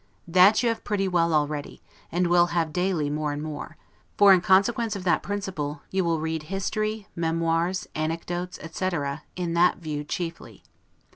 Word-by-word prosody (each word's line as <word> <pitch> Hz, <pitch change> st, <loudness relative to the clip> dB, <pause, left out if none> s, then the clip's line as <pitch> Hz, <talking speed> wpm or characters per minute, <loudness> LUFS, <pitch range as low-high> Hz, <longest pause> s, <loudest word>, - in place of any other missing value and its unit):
That 185 Hz, +7 st, +5 dB
you 235 Hz, -, +3 dB
have 230 Hz, -, -3 dB
pretty 200 Hz, -2 st, 0 dB
well 170 Hz, -2 st, +2 dB
already, 150 Hz, -1 st, -1 dB, 0.3 s
and 180 Hz, +2 st, +1 dB
will 175 Hz, 0 st, +4 dB
have 170 Hz, -3 st, -1 dB
daily 180 Hz, -4 st, 0 dB
more 150 Hz, 0 st, -1 dB
and 145 Hz, +1 st, -4 dB
more; 155 Hz, -1 st, -7 dB, 0.4 s
for, 200 Hz, -1 st, +8 dB
in 185 Hz, -, +4 dB
consequence 215 Hz, +4 st, +3 dB
of 195 Hz, -, -5 dB
that 180 Hz, -, +2 dB
principle, 185 Hz, -8 st, -4 dB
you 190 Hz, 0 st, +1 dB
will 165 Hz, -2 st, 0 dB
read 160 Hz, 0 st, -2 dB
history, 215 Hz, +5 st, -3 dB
memoirs, 165 Hz, +2 st, 0 dB
anecdotes, 170 Hz, +3 st, -3 dB
etc., 160 Hz, -4 st, -3 dB
in 175 Hz, -2 st, -2 dB
that 175 Hz, +1 st, +4 dB
view 150 Hz, -3 st, -4 dB
chiefly. 165 Hz, +2 st, -6 dB
175 Hz, 160 wpm, -25 LUFS, 160-190 Hz, 0.4 s, for